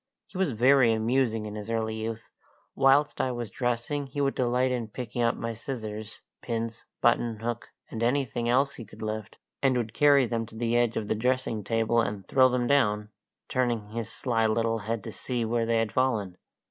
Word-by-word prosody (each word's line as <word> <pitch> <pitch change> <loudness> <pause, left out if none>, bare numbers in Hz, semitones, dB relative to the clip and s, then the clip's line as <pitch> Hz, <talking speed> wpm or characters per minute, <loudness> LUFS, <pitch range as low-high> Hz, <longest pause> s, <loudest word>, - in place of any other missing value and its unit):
He - - -25
was 180 -9 +1
very 125 +1 +5
amusing 115 0 +1
in 105 - -6
his 105 +1 -7
early 110 -1 -1
youth. 110 +1 -5 0.4
Whilst 140 +2 +3
I 130 - 0
was 120 -4 -5
dressing 125 +4 -2
he 135 +2 -6
would 140 -1 +2
delight 125 +1 +1
in 120 -3 -2
picking 120 +1 -5
up 115 -1 +2
my 115 0 -4
scissors, 110 -3 -6 0.2
pins, 115 -1 -4 0.2
buttonhook, 120 -1 +1 0.2
and 115 - -5
anything 120 -1 0
else 135 +3 +3
he 115 - -8
could 110 - -11
lift, 110 -1 -4 0.2
and 135 -2 +3
would 110 -2 -2
carry 140 -1 +5
them 115 -1 -2
to 110 - -14
the 115 +1 0
edge 120 -1 +2
of 105 - -2
the - - +1
dressing 120 -1 0
table 115 +2 +2
and 100 -3 -4
throw 130 -1 +5
them 125 -1 0
down, 105 -6 +2 0.4
turning 120 -5 -1
his 115 0 -4
sly 115 -3 0
little 115 +1 +1
head 110 0 -3
to 110 - -6
see 120 +1 -2
where 115 0 0
they 115 0 +2
had 115 -2 0
fallen. 110 -7 0
115 Hz, 195 wpm, -28 LUFS, 110-125 Hz, 0.4 s, very